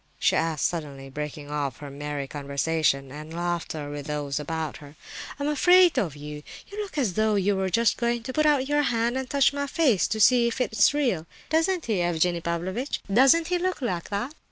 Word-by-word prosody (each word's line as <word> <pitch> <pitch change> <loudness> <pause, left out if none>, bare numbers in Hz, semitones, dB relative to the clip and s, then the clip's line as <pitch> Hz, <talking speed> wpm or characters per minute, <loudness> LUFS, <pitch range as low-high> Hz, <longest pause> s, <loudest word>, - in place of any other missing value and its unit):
she - - +2
asked 160 -2 0
suddenly, 140 -5 -4
breaking 150 +1 -6
off 140 -4 -2
her 145 -1 -9
merry 145 0 -5
conversation 140 -1 -1
and 155 +3 -9
laughter 170 -4 -3
with 145 -1 -6
those 145 -1 -2
about 160 +1 -4
her. 145 0 -14 0.4
"I'm 285 - -1
afraid 355 +4 +5
of 160 -7 -2
you! 150 0 -8 0.3
You 415 +1 -4
look 390 -7 -7
as 240 -10 +1
though 215 +1 +2
you 200 0 +2
were 190 0 -1
just 230 +4 +2
going 235 -1 -1
to 260 - -5
put 305 +2 +2
out 280 -3 +2
your 295 +1 +2
hand 235 -3 0
and 265 -1 -3
touch 280 0 +3
my 285 0 -2
face 270 - +2
to 220 - -2
see 240 +2 +5
if 235 +3 -3
it's 220 -5 +3
real! 235 - 0 0.2
Doesn't 330 +2 +1
he, 210 -6 0
Evgenie 175 0 +1
Pavlovitch—doesn't 235 - +1
he 360 -1 +1
look 370 +1 -1
like 185 - -3
that?" 210 +8 -3
190 Hz, 200 wpm, -26 LUFS, -, 0.4 s, afraid